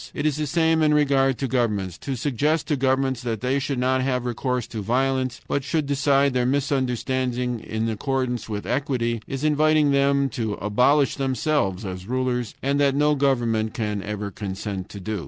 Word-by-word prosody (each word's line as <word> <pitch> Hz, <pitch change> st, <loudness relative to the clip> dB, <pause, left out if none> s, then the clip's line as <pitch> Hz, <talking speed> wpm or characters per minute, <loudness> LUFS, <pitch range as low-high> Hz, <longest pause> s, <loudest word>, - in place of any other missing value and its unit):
It 145 Hz, -, -2 dB
is 155 Hz, -3 st, +2 dB
the 155 Hz, -1 st, -1 dB
same 160 Hz, +1 st, +2 dB
in 150 Hz, -1 st, +4 dB
regard 135 Hz, -3 st, +3 dB
to 135 Hz, -, -2 dB
governments. 105 Hz, -8 st, 0 dB
To 135 Hz, -, -4 dB
suggest 145 Hz, +5 st, 0 dB
to 150 Hz, -, +2 dB
governments 130 Hz, -1 st, +1 dB
that 115 Hz, -4 st, -3 dB
they 130 Hz, +2 st, +1 dB
should 140 Hz, -1 st, -2 dB
not 130 Hz, +1 st, +1 dB
have 130 Hz, -1 st, -1 dB
recourse 125 Hz, 0 st, -1 dB
to 110 Hz, -, -6 dB
violence, 130 Hz, +3 st, 0 dB
but 140 Hz, -, -1 dB
should 150 Hz, +2 st, -1 dB
decide 140 Hz, -1 st, +2 dB
their 125 Hz, -1 st, +1 dB
misunderstandings 130 Hz, -2 st, -1 dB
in 110 Hz, +1 st, -2 dB
accordance 125 Hz, +1 st, -2 dB
with 105 Hz, -1 st, -4 dB
equity, 120 Hz, -5 st, -1 dB
is 135 Hz, +1 st, -4 dB
inviting 155 Hz, -1 st, +3 dB
them 140 Hz, 0 st, +3 dB
to 110 Hz, -3 st, -3 dB
abolish 125 Hz, +8 st, +2 dB
themselves 130 Hz, -, 0 dB
as 95 Hz, 0 st, -6 dB
rulers, 125 Hz, -3 st, -1 dB
and 140 Hz, +1 st, +1 dB
that 140 Hz, -1 st, +3 dB
no 150 Hz, +1 st, +3 dB
government 120 Hz, -6 st, +1 dB
can 105 Hz, -3 st, -2 dB
ever 105 Hz, 0 st, -4 dB
consent 95 Hz, 0 st, -5 dB
to 100 Hz, -, -8 dB
do. 105 Hz, +2 st, -3 dB
130 Hz, 180 wpm, -24 LUFS, 115-140 Hz, -, in